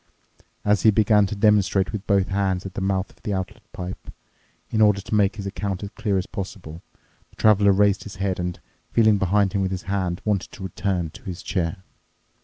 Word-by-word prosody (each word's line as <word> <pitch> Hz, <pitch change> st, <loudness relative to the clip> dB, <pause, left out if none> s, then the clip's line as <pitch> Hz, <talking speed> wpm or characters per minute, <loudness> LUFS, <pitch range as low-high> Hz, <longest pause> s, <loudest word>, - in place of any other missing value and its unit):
As 105 Hz, -1 st, +3 dB
he 110 Hz, -, +6 dB
began 105 Hz, -1 st, +4 dB
to 105 Hz, -, -4 dB
demonstrate 100 Hz, -2 st, +3 dB
with 105 Hz, -2 st, -6 dB
both 100 Hz, -2 st, +2 dB
hands 95 Hz, -2 st, 0 dB
at 95 Hz, -, -6 dB
the -, -, -4 dB
mouth 95 Hz, 0 st, -1 dB
of -, -, -26 dB
the 105 Hz, -, -2 dB
outlet 95 Hz, -1 st, -5 dB
pipe, 90 Hz, 0 st, -7 dB, 0.6 s
in 110 Hz, -, +1 dB
order 105 Hz, -2 st, +5 dB
to 100 Hz, -, -7 dB
make 105 Hz, -1 st, +3 dB
his 100 Hz, -3 st, -6 dB
account 100 Hz, -1 st, -3 dB
as 100 Hz, -, -6 dB
clear 105 Hz, -5 st, -1 dB
as 95 Hz, -, -1 dB
possible, 90 Hz, -5 st, -7 dB, 0.5 s
the -, -, -25 dB
Traveler 105 Hz, -2 st, +5 dB
raised 100 Hz, 0 st, +3 dB
his 105 Hz, -, -9 dB
head 95 Hz, -1 st, -2 dB
and, 90 Hz, 0 st, -3 dB, 0.3 s
feeling 110 Hz, -3 st, +4 dB
behind 100 Hz, +1 st, +2 dB
him 100 Hz, -, +1 dB
with 95 Hz, -, 0 dB
his 95 Hz, -1 st, -4 dB
hand, 95 Hz, -3 st, -2 dB
wanted 105 Hz, -3 st, -1 dB
to 115 Hz, -6 st, -9 dB
return 95 Hz, -3 st, -2 dB
to -, -, -14 dB
his 90 Hz, -1 st, -6 dB
chair. 90 Hz, 0 st, -2 dB
100 Hz, 205 wpm, -23 LUFS, 95-105 Hz, 0.6 s, he